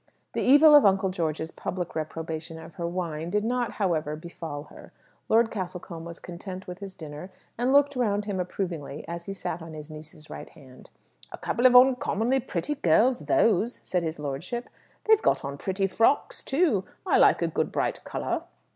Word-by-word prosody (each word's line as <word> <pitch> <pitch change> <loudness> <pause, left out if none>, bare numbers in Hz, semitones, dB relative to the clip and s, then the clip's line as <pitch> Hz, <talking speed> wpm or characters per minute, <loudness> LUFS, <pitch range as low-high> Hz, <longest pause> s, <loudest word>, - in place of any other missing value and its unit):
The - - -1
evil 295 +3 +7
of 290 - +9
Uncle 195 -1 +3
George's 160 -2 -2
public 180 -2 -4
reprobation 160 +1 -5
of 160 0 -11
her 170 - -4
wine 170 -2 -3
did 210 +3 0
not, 240 -2 -1
however, 160 -7 -1
befall 160 -2 -7
her. - - -14 0.4
Lord 225 +1 +4
Castlecombe 180 -4 -6
was 170 0 -7
content 185 +2 -8
with 180 +1 -8
his 195 -2 -8
dinner, 155 +3 -8 0.3
and 245 +3 0
looked 285 0 +4
round 210 -4 0
him 200 -3 -3
approvingly 170 -5 -4
as 170 0 -6
he 195 - -4
sat 175 -2 -4
on 165 -1 -9
his 155 0 -9
niece's 155 0 -11
right - - -9
hand. 130 -2 -16 0.4
"A - - -7
couple 240 +3 +3
of 250 - +3
uncommonly 250 -1 +4
pretty 265 +3 -3
girls 240 - +3
those," 230 - +2
said 180 - 0
his 160 -1 -3
lordship. 150 - -5 0.3
"They've 440 0 +5
got - - +1
on 140 0 -5
pretty 195 0 -1
frocks, 225 +8 +1
too; 270 - +2 0.2
I - - +3
like - - +5
a - - +2
good - - -1
bright - - -1
colour." - - -3
185 Hz, 180 wpm, -27 LUFS, 160-230 Hz, 0.4 s, of